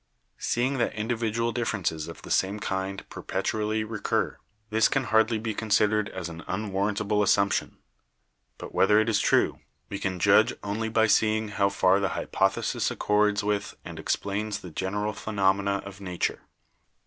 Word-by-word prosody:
Seeing 130 +3 0
that 120 - 0
individual 115 +1 -1
differences 100 -10 -2
of - - -10
the - - -8
same 100 +2 +1
kind 95 0 -3
perpetually 110 0 -2
recur, 110 -1 -2 0.3
this 110 +1 +4
can 135 - +1
hardly 110 0 +3
be 110 0 -3
con 110 +1 -5
sidered 105 0 +3
as 85 - -5
an 85 0 -8
unwarrantable 100 +1 0
assumption. 100 0 +2 0.8
But - - -9
whether 105 +2 +5
it 110 +1 +1
is 110 - +2
true, - - +2 0.3
we 100 - -4
can 95 -1 -2
judge 85 - +4
only 110 +2 -2
by 110 0 +3
seeing 110 0 +2
how 100 -1 +1
far 95 -1 +3
the 100 -1 0
hypothe 95 0 +1
202 - - -7
BIOLOGY - - -2
sis - - 0
accords 105 0 +1
with 105 0 -1
and - - -8
explains 100 +1 -2
the 90 - -9
general 105 +5 -2
phenomena 100 -2 0
of 100 0 -10
nature. 90 -2 -2
105 Hz, 165 wpm, -27 LUFS, 100-110 Hz, 0.8 s, whether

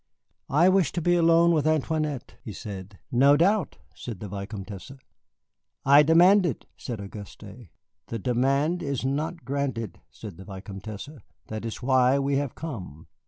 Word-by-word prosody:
"I 155 +6 +4
wish 190 -2 +3
to 175 - -1
be 175 +2 +2
alone 170 0 +5
with 155 -2 +2
Antoinette," 155 -3 -1
he 110 - -7
said. 100 0 -8
"No 140 +4 +5
doubt," 195 +4 +2 0.2
said 110 -1 -8
the 105 - -6
Vicomtesse. 100 +3 -7 0.9
"I 140 +2 +8
demand 175 +6 +6
it," 170 -6 -2
said 120 -4 -6
Auguste. 100 +1 -9 0.6
"The 115 - -4
demand 135 - +1
is 140 -3 -3
not 155 +3 -2
granted," 130 -5 -3
said 105 -7 -10
the 95 - -11
Vicomtesse; 100 +4 -8 0.4
"that 110 +1 -5
is 115 +1 -6
why 130 0 +4
we 140 0 +1
have 140 -3 -2
come. 95 - -7
135 Hz, 150 wpm, -26 LUFS, 105-155 Hz, 0.9 s, I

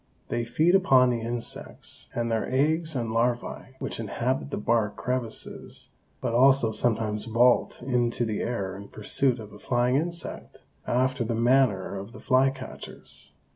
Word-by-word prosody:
They 120 - -1
feed 155 +9 +2
upon 130 -10 +5
the 120 -1 -1
insects 115 +1 -4
and 115 -1 -1
their 115 +2 -1
eggs 155 +4 +1
and 115 -3 -1
larvæ 120 +2 -1
which - - -4
inhabit 125 +5 -1
the - - -3
bark 105 -1 +1
crevices, 125 -3 -3 0.3
but - - -1
also 130 -1 +5
sometimes 110 -1 0
vault 120 +2 +3
into 120 -2 +1
the 110 -2 -2
air 100 -6 -2
in 100 +1 -9
pursuit 125 +5 0
of 105 -3 -10
a 105 - -12
flying 125 +3 +1
insect, 170 +2 -4 0.2
after 130 +1 +1
the 115 0 -1
manner 120 -5 +2
of 100 +4 -9
the 125 - -10
flycatchers. 135 0 -1
120 Hz, 150 wpm, -27 LUFS, 115-130 Hz, 0.3 s, upon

